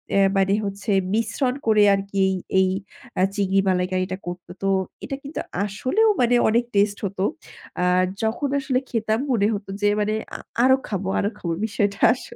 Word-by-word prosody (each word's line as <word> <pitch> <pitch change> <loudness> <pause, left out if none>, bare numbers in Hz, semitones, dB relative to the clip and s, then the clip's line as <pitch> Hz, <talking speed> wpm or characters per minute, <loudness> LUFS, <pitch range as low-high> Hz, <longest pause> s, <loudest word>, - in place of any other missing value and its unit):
এ্যা 195 - +5
মানে 195 +1 +3
হচ্ছে 200 +2 -3 0.2
মিশ্রণ 230 +4 0
করে 215 -1 +5
আর 195 - +1
কি 200 - -4
এই 190 - 0 0.2
এই 190 - +4 0.5
আ - - +4
চিংড়ি 195 -1 +2
মালাইকারিটা 185 0 0
করতো। 175 0 -7
তো 195 - +2 0.4
এটা 275 - -4
কিন্তু 285 +3 -6 0.3
আসলেও 260 - +1
মানে 245 0 +4
অনেক 235 +2 +3
taste 205 0 +2
হতো। 190 -1 -3 0.6
আ - - +3 0.4
যখন 230 +6 0
আসলে 265 -2 0
খেতাম 220 -1 0
মনে 210 -4 +3
হতো 200 -1 -5
যে 205 - +4
মানে 210 +1 0 0.2
আ - - -5 0.2
আরো 260 0 +6
খাবো 195 -2 -3
আরো 200 - +1
খাবো 170 -2 -3
বিষয়টা 200 -2 -1
আস 255 - -9
205 Hz, 175 wpm, -23 LUFS, 195-230 Hz, 0.6 s, আরো